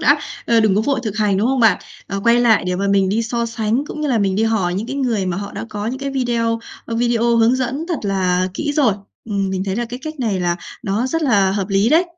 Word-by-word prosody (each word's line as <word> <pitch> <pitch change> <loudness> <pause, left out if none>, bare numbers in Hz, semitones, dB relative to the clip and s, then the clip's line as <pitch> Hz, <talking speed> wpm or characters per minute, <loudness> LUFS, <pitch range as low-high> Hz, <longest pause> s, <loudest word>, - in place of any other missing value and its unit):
đã, - - +4 0.3
ơ, 230 -1 +4
đừng 215 -3 +3
có 210 - +3
vội 270 +3 0
thực 215 -4 -4
hành, 205 -3 +2
đúng 210 +4 +1
không 265 -1 +1
bạn? 220 -5 +5 0.3
Ờ, 195 0 -3
quay 235 +1 +5
lại 230 -5 +4
để 180 0 0
mà 200 +2 -1
mình 195 -1 +3
đi 220 +4 +1
so 235 +1 -1
sánh, 230 +3 -1
cũng 305 - -6
như 300 - -1
là 245 -4 +2
mình 195 -2 +1
đi 220 - +2
hỏi 210 -6 +1
những 210 +4 -3
cái 275 +2 -4
người 230 -8 0
mà 180 -1 -2
họ 200 0 -5
đã - - -5
có 210 -1 -4
những 255 +3 -3
cái 275 0 -3
video, 235 -3 0 0.3
ơ, 230 - -5
video 235 0 +2
hướng 230 +2 +4
dẫn 260 +5 -2
thật 335 -5 -1
là 185 -2 +1
kỹ 290 - -2
rồi, 265 -9 +3 0.3
ừm, 200 -3 -1
mình 190 0 -2
thấy 195 0 -2
là 240 - -1
cái 245 +2 -7
cách 310 -2 -6
này 210 -6 0
là 175 -1 0 0.3
nó 215 +3 -1
rất 325 +5 -1
là 205 -8 +3
hợp 195 -1 -2
lý 195 +2 +2
đấy. 325 +6 +4
225 Hz, 280 wpm, -19 LUFS, 195-245 Hz, 0.3 s, bạn